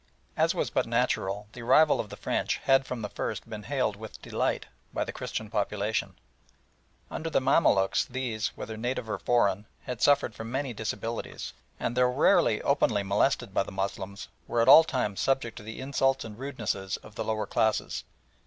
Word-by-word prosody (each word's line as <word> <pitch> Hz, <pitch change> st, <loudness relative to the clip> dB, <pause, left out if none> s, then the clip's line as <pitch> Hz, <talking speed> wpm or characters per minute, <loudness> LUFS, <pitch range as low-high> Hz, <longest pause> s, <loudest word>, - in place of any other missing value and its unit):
As -, -, +2 dB
was -, -, -1 dB
but -, -, +1 dB
natural, 100 Hz, +2 st, 0 dB
the 125 Hz, -, -8 dB
arrival 150 Hz, +6 st, +5 dB
of 105 Hz, -, -3 dB
the -, -, -9 dB
French -, -, -1 dB
had 135 Hz, 0 st, +4 dB
from 120 Hz, -3 st, -4 dB
the 105 Hz, -, -3 dB
first -, -, -4 dB
been 110 Hz, -2 st, -6 dB
hailed 125 Hz, -3 st, -1 dB
with 110 Hz, +1 st, -10 dB
delight -, -, -1 dB, 0.3 s
by -, -, -1 dB
the -, -, -5 dB
Christian 110 Hz, -, -4 dB
population. 105 Hz, +1 st, -1 dB, 1.0 s
Under 165 Hz, -, -3 dB
the 155 Hz, -, +2 dB
Mamaluks 130 Hz, -8 st, +3 dB
these, 120 Hz, -4 st, -2 dB
whether 110 Hz, -1 st, -6 dB
native 120 Hz, 0 st, -2 dB
or 105 Hz, -3 st, -3 dB
foreign, 105 Hz, -4 st, +2 dB, 0.2 s
had 125 Hz, -3 st, -5 dB
suffered 145 Hz, -5 st, +4 dB
from 110 Hz, +1 st, -7 dB
many 135 Hz, -1 st, -2 dB
disabilities, 110 Hz, +1 st, -4 dB, 0.3 s
and, 120 Hz, -, -2 dB
though 125 Hz, 0 st, +4 dB
rarely 125 Hz, -, +3 dB
openly 100 Hz, -1 st, +2 dB
molested 100 Hz, +2 st, +1 dB
by -, -, +3 dB
the -, -, -5 dB
Moslems, 100 Hz, 0 st, -4 dB, 0.2 s
were 120 Hz, -, 0 dB
at 115 Hz, -, +3 dB
all 160 Hz, +4 st, +10 dB
times 125 Hz, -10 st, -2 dB
subject 135 Hz, -4 st, 0 dB
to -, -, -7 dB
the 110 Hz, +1 st, -7 dB
insults 135 Hz, -1 st, +1 dB
and 110 Hz, 0 st, -9 dB
rudenesses 110 Hz, -8 st, -3 dB
of 110 Hz, -, -13 dB
the -, -, -3 dB
lower 110 Hz, -1 st, -1 dB
classes. 110 Hz, -1 st, 0 dB
110 Hz, 180 wpm, -28 LUFS, 105-130 Hz, 1.0 s, all